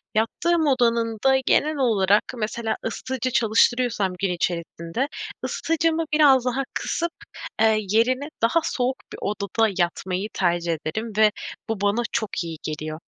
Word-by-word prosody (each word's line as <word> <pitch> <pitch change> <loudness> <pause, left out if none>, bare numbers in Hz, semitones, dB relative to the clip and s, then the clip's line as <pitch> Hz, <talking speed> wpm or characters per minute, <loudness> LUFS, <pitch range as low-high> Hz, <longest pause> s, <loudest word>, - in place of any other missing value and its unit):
yattığım 315 +9 +1
odanın 235 -4 +2
da 265 0 +6
genel 305 +1 +2
olarak, 210 -6 +3
mesela, 220 0 -2
ısıtıcı 255 +2 -3
çalıştırıyorsam 230 -3 +2
gün 195 - 0
içerisinde 170 +6 -2 0.4
ısıtıcımı 330 0 0
biraz 275 -5 +5
daha 260 +2 0
kısıp, 340 0 -2 0.5
eee, 220 -1 +5
yerine 255 +6 +2
daha 230 +9 +3
soğuk 255 -3 0 0.2
bir - - -8
odada 210 +2 0
yatmayı 185 +2 -1
tercih 175 -2 +1
ederim. 220 +8 -3
Ve 215 -1 +6 0.4
bu 220 -3 -2
bana 205 +3 +2
çok 220 -5 -2
iyi 165 -1 -6
geliyor. 155 0 -5
225 Hz, 135 wpm, -24 LUFS, 195-260 Hz, 0.5 s, da